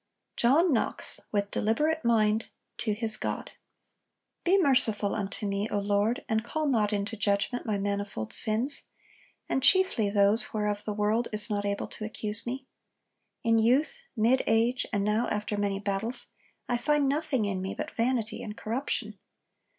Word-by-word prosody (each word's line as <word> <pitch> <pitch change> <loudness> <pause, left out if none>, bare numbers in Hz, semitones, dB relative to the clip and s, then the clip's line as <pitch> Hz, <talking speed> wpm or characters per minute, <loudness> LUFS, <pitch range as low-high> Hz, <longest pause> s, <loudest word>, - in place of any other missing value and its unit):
JOHN 290 +7 +4
KNOX, 230 - -2
WITH 205 -1 -1
DELIBERATE 300 +9 0
MIND, 220 -2 +2 0.3
TO 215 - 0
HIS 220 0 -2
GOD. - - -4 0.9
'Be 370 +3 +4
merciful 225 - +4
unto 205 +1 -3
me, 200 +2 -1
O - - -1
Lord, 205 +5 0
and 220 0 0
call 310 +6 -2
not 225 -7 +2
into 205 +2 -2
judgment 205 +4 -1
my 210 -2 0
manifold 200 - -3
sins; 230 +7 +1 0.6
and 265 - 0
chiefly 325 - +4
those 205 +2 +3
whereof 210 -1 -1
the 210 - -2
world 215 +3 +1
is 215 0 0
not 205 -1 -1
able 200 0 -2
to 215 - -8
accuse 215 +1 0
me. 260 +2 -4 0.8
In 230 -1 +3
youth, 280 - +2 0.2
mid 235 +4 +3
age, 230 +3 +2
and 200 -1 0
now 210 +3 +1
after 210 0 -2
many 200 -1 -1
battles, 205 +4 -3 0.4
I 245 - +1
find 290 +3 +2
nothing 275 -5 0
in 195 -2 -2
me 190 +1 -4
but - - -5
vanity 230 -1 -1
and 210 -1 -7
corruption. 235 +6 -3
220 Hz, 160 wpm, -28 LUFS, 205-245 Hz, 0.9 s, JOHN